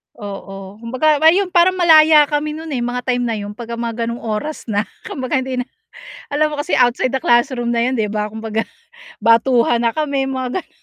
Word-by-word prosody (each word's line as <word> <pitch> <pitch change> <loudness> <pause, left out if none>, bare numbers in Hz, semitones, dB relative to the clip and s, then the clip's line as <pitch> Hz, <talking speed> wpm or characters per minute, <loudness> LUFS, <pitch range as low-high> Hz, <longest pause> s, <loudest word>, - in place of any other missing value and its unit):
Oo, 195 -1 -9
kumbaga 255 +6 +1
ayun 370 +3 +4
parang 355 +2 +4
malaya 315 -3 +6
kami 300 +1 -1
no'n, 320 0 -8
eh, 265 - -2
mga 245 +1 -3
time 245 -1 -1
na 230 - -1
'yun 205 -1 -5
'pagka 235 +2 -7
mga 230 0 -3
gano'ng 235 +1 -5
oras 225 +7 -4
na. 205 +1 0 0.2
Kumbaga 260 0 -2
hindi 255 -1 -4
na 250 - -2 0.6
alam 305 +1 0
mo 290 - -2
kasi 320 - -1
outside 245 +1 +2
the 265 - -1
classroom 240 -1 +1
na 235 - +1
'yun, 255 +1 0
di 220 - +1
ba, 210 0 -3
kumbaga 220 0 -3 0.6
batuhan 235 +1 +3
na 235 - +2
kami, 280 -3 -1
mga 260 +5 -3
ganon. - - -30
245 Hz, 200 wpm, -18 LUFS, 230-295 Hz, 0.6 s, malaya